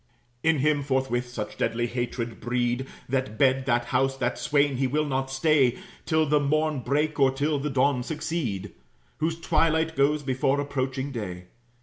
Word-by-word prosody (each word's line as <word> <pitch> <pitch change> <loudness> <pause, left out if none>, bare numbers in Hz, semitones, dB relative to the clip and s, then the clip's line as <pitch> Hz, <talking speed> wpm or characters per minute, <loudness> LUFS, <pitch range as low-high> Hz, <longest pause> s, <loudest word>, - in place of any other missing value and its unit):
In 160 +2 +3
him, 145 +1 +2
forthwith, 130 -3 -1
such 110 -4 -6
deadly 115 +1 0
hatred 120 -1 -3
breed 120 +1 -1 0.2
That 130 -4 -2
bed, 130 0 +3
that 120 -1 +2
house, 135 +1 +2
that 120 -2 -1
swain, 145 -2 +2
he 135 0 +1
will 150 +4 0
not 135 -1 -1
stay 135 -2 +3 0.3
Till 160 0 +3
the 150 0 +3
morn 155 +1 +1
break, 145 +5 0
or 135 -1 +6
till 145 +2 0
the 150 +2 -2
dawn 135 -1 +2
succeed, 140 - -3 0.5
Whose 160 +1 -1
twilight 160 0 +1
goes 145 +2 +2
before 135 +1 +1
approaching 135 -1 -2
day. 90 -8 -5
135 Hz, 160 wpm, -26 LUFS, 125-150 Hz, 0.5 s, or